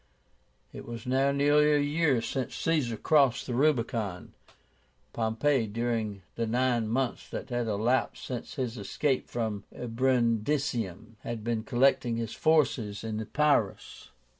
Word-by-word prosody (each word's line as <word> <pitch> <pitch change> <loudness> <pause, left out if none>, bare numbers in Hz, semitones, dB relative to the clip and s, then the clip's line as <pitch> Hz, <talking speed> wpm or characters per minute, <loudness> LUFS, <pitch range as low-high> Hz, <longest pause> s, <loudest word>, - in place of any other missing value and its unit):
It - - -9
was 115 -1 -7
now 135 +2 +2
nearly 145 +2 +4
a - - +4
year 145 -4 +1
since 130 -2 -3
Caesar 145 -9 0
crossed 135 -1 +3
the 125 - -4
Rubicon. 115 -8 0 0.8
Pompey, 115 +2 +1
during 110 -3 -2
the 115 -1 -2
nine 120 -1 +1
months 125 +2 -2
that - - -6
had 120 -1 -1
elapsed 110 +5 0
since 125 -2 -6
his 125 -3 -3
escape 130 +7 -1
from 110 -4 -3
Brundisium, 115 - -1
had 120 -4 -5
been 115 -1 -1
collecting 120 -2 +2
his 115 -1 -3
forces 130 -11 +1
in 110 -1 -3
Epírus. 140 -4 0
120 Hz, 130 wpm, -29 LUFS, 110-135 Hz, 0.8 s, nearly